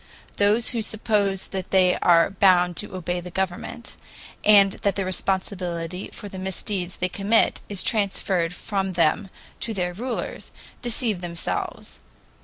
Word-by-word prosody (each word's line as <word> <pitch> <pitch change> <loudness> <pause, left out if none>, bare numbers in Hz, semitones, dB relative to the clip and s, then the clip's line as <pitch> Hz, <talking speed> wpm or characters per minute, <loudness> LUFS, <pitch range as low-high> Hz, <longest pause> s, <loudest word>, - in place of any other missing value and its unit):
Those 210 +3 +3
who 235 -2 -2
suppose 210 -3 0
that 190 -2 -5
they 185 -1 +4
are 170 -1 +4
bound 180 -2 +4
to 210 - -5
obey 180 0 -2
the 180 0 -8
government, 190 +5 -4 0.5
and 200 -2 +7
that 200 - +1
the 195 - -1
responsibility 185 -2 -2
for 205 - -9
the 190 -1 -8
misdeeds 190 -1 -3
they 180 - 0
commit 200 +5 +2
is 195 -3 -1
transferred 190 -5 0
from 195 0 -2
them 170 +3 +2 0.3
to 225 - -3
their 180 -2 -1
rulers, 240 +6 -4 0.3
deceive 235 -5 +1
themselves. 170 -1 -4
190 Hz, 140 wpm, -24 LUFS, 180-205 Hz, 0.5 s, and